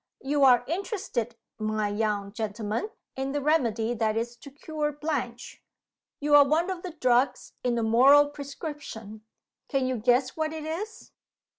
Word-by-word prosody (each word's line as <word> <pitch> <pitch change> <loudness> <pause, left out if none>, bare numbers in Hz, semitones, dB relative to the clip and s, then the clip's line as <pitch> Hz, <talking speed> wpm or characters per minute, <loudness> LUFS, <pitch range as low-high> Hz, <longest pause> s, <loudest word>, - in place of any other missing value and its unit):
"You 280 +1 +1
are 245 -2 +6
interested, 340 - -3 0.2
my 215 -1 -1
young 205 -1 -1
gentleman, 215 - -3 0.3
in 270 +1 -3
the 290 - 0
remedy 240 -6 +1
that 220 -1 0
is 235 +1 -2
to 280 - -12
cure 300 +1 -3
Blanche. 275 -5 -4 0.6
You 290 0 0
are 290 -1 +10
one 320 +6 +1
of 365 -2 -5
the 360 -2 -7
drugs 255 -3 +1
in 245 -1 +1
the 230 - 0
moral 270 +6 +6
prescription. 285 - -8 0.5
Can 270 -3 0
you 255 -1 -1
guess 245 +3 +2
what 315 0 -2
it 315 -1 -6
is?" 390 +8 -6
265 Hz, 155 wpm, -27 LUFS, 230-300 Hz, 0.6 s, are